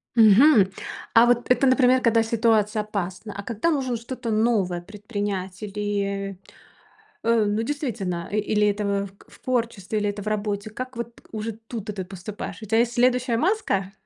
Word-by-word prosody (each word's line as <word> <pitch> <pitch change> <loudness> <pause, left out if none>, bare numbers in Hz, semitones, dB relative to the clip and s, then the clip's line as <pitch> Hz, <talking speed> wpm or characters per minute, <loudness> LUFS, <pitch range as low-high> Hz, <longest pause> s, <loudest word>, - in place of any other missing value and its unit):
Мгм. 220 -1 +6 0.4
А 230 0 +7
вот 240 0 +2
это, 250 +2 +4
например, 255 -1 +4
когда 230 -1 +4
ситуация 220 -2 +2
опасна, 200 0 -5
а 200 - -5
когда 235 +8 -1
нужно 260 -6 0
что-то 235 0 -5
новое 210 -6 +1
предпринять, 205 -2 -5
или, 200 -2 -3 0.9
э, 230 -1 +3
ну, 210 +2 0
действительно 225 - -3
и 205 - -2
или 210 0 +2
это 205 0 -1
в 200 -1 -2
к - - -22
в - - -17
творчестве, 230 -5 -1
или 205 - 0
это 205 0 -6
в 210 - -12
работе, 210 0 -2
как 255 +3 -7
вот 235 0 -6
уже 220 +1 -3 0.2
тут-то 220 -3 -5
ты 190 -2 -5
поступаешь, 200 +4 -7
у - - -6
тебя 225 +2 +2
есть 240 0 +1
следующая 250 0 +2
маска? 250 - 0
215 Hz, 170 wpm, -24 LUFS, 200-235 Hz, 0.9 s, А